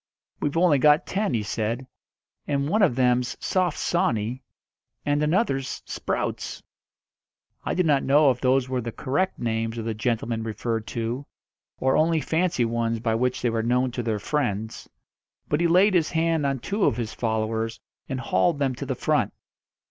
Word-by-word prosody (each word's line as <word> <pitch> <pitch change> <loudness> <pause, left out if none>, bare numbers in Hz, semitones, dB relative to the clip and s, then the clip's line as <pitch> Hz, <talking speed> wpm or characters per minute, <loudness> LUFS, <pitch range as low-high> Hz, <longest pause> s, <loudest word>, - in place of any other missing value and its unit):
"We've 145 +2 -1
only 165 -5 +4
got 150 +4 +5
ten," 200 - -1
he 110 - 0
said. 115 +5 -2 0.6
"And 140 -1 0
one 215 +8 +2
of 170 -12 +4
them's 125 -1 +1
Soft 180 -4 0
Sawney, 120 -6 0 0.6
and 145 0 +1
another's 150 - 0
Sprouts." - - -3 1.0
I - - -2
do 180 - +2
not 145 -4 +3
know 140 +1 +5
if 125 - -5
those 130 0 +2
were 130 -1 -1
the 115 0 -4
correct 145 +12 -1
names 115 0 -2
of 115 - -4
the 115 - -1
gentlemen 115 0 -1
referred 110 0 -3
to, 120 +4 -3 0.5
or 130 0 +2
only 160 +1 +3
fancy 160 -5 +1
ones 115 0 -1
by 115 0 0
which 125 +3 0
they 120 - +2
were 115 0 0
known 125 +2 +1
to 120 - -3
their 110 -2 -1
friends; 110 -3 -2 0.6
but 150 +2 0
he 170 - +4
laid 185 +4 +5
his 170 -4 +3
hand 165 -2 +1
on 135 -1 0
two 195 - -1
of 110 - +2
his 115 -2 -3
followers 110 0 -2 0.3
and 130 -1 -3
hauled 120 - +2
them 140 -2 0
to 135 +2 -6
the 130 - -1
front. - - +1
130 Hz, 175 wpm, -25 LUFS, 115-150 Hz, 1.0 s, got